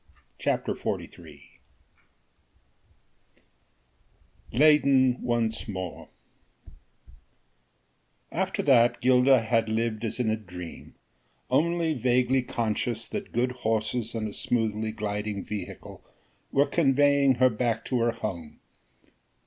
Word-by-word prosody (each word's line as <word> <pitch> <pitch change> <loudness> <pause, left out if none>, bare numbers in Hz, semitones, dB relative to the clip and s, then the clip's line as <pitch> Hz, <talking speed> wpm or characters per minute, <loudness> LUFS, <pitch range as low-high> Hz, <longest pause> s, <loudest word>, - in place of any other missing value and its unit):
CHAPTER - - -1
XLIII - - -7 2.9
LEYDEN 135 -2 +4
ONCE 120 -2 -1
MORE 95 -4 -6 2.2
After - - -2
that 120 -4 +4
Gilda 130 0 +4
had 115 0 0
lived 110 0 -1
as 115 +2 -3
in 115 -3 +1
a - - +1
dream: 90 -5 -10 0.6
only 170 0 +2
vaguely 125 0 +2
conscious 115 -1 -2
that - - -5
good 125 +2 0
horses 115 -1 -2
and 110 -1 -2
a 105 - -7
smoothly 110 -2 -1
gliding 105 -1 -4
vehicle 105 -1 -8 0.5
were 140 +1 +3
conveying 140 -3 +3
her 130 +1 +4
back 115 0 -1
to 125 - -1
her 115 0 +2
home. 95 -9 -6
115 Hz, 100 wpm, -27 LUFS, 110-130 Hz, 2.9 s, LEYDEN